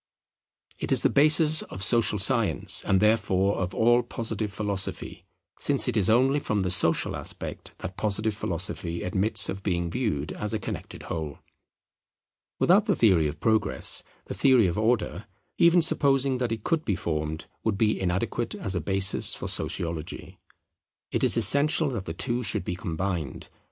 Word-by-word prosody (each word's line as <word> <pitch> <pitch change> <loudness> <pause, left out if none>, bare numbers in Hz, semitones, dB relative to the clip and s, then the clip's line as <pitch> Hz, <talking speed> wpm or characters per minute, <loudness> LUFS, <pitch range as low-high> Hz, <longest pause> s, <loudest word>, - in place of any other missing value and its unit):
It - - -3
is - - +3
the - - +3
basis 155 +2 +5
of 95 - -8
social 115 -2 +2
science 115 +1 +2
and 95 - +2
therefore 100 -2 +1
of 95 +1 -4
all 120 +2 +3
Positive 110 -3 -5
Philosophy; 100 -1 -3 0.3
since - - +3
it - - -1
is 100 -4 +1
only 130 +5 +3
from 105 -7 -2
the 90 -1 -1
social 85 -2 0
aspect - - -7
that 95 - -8
Positive 110 +1 -1
Philosophy 90 -4 -3
admits 100 +3 +2
of 95 - -5
being 85 -3 -2
viewed 85 - -2
as 105 +1 -2
a - - -2
connected - - -7
whole. 80 -3 -5 1.2
Without 200 +5 +3
the 200 - +2
theory 90 -9 +3
of 75 +1 -7
Progress, 110 -1 0 0.2
the - - -6
theory 130 -5 +4
of 90 +2 -1
Order, 110 -3 -1 0.3
even 170 0 +5
supposing 135 -4 +1
that 125 -2 -2
it 110 -2 -4
could 165 -2 -1
be 100 - -1
formed, 80 -1 -4 0.2
would 110 -3 -1
be 105 -2 0
inadequate 95 +6 -2
as 95 - -1
a 90 - -1
basis 95 +3 +3
for - - -6
Sociology. 85 -2 -4 0.7
It - - -1
is - - +5
essential 150 +2 +3
that 115 -8 -5
the 80 - -5
two 120 +5 0
should 105 -7 0
be 90 - -4
combined. 85 -4 -5
105 Hz, 165 wpm, -26 LUFS, 90-120 Hz, 1.2 s, basis